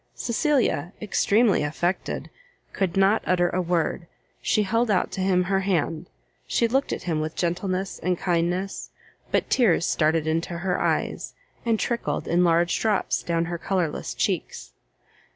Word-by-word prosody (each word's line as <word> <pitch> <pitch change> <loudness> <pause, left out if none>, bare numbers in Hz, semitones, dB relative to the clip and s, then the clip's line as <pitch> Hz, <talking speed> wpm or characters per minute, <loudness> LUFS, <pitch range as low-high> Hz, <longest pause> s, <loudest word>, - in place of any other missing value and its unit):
Cecilia, 235 - 0
extremely 215 +1 +2
affected, 165 +5 -2 0.4
could 190 -1 -1
not 195 +3 +4
utter 175 -1 +3
a 185 - 0
word; 170 -1 -1 0.3
she 215 - +2
held 230 +4 +1
out 195 -3 +1
to 190 - -4
him 185 -1 +3
her 195 +1 +1
hand, 175 -3 -1 0.4
she 235 - +2
looked 270 +4 0
at - - -3
him 160 -3 -1
with 155 +1 -4
gentleness 185 +2 -2
and 180 -1 0
kindness, 175 +2 -1 0.4
but - - 0
tears 205 -9 +3
started 155 0 +1
into 165 +2 -1
her 180 +1 -1
eyes, - - -1 0.3
and 225 -2 +2
trickled 235 -1 -2
in 175 +1 +3
large 170 0 +2
drops 215 -3 +1
down 170 0 0
her 170 0 -4
colourless 180 -5 -2
cheeks. - - -2
180 Hz, 150 wpm, -25 LUFS, 170-200 Hz, 0.4 s, not